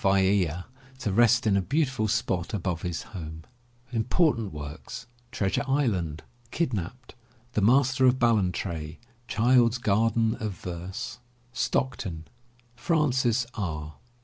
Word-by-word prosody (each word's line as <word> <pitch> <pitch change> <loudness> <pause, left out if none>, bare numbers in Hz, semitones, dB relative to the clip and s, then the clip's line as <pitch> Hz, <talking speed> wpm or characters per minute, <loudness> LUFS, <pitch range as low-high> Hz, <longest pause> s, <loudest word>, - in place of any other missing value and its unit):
Vaea 95 -3 +2 0.3
to 120 -6 -2
rest 120 +4 +4
in 105 -2 +3
a 100 - +3
beautiful 130 - 0
spot 105 -4 -1
above 90 -4 -2
his 85 -2 -3
home. 80 -3 -7 1.9
Treasure 95 +5 0
Island. 100 - 0 0.3
Kidnapped. 125 - -3 0.4
The 105 - +1
Master 130 +4 +4
of 125 0 +4
Ballantrae. 90 -9 0 0.3
Child's 120 +1 +4
Garden 115 0 +2
of 110 -4 -3
Verse. 90 +8 -6 0.3
STOCKTON, 115 -10 -1 0.5
FRANCIS 130 -5 +2
R. 80 -7 -4
110 Hz, 100 wpm, -27 LUFS, 90-125 Hz, 1.9 s, rest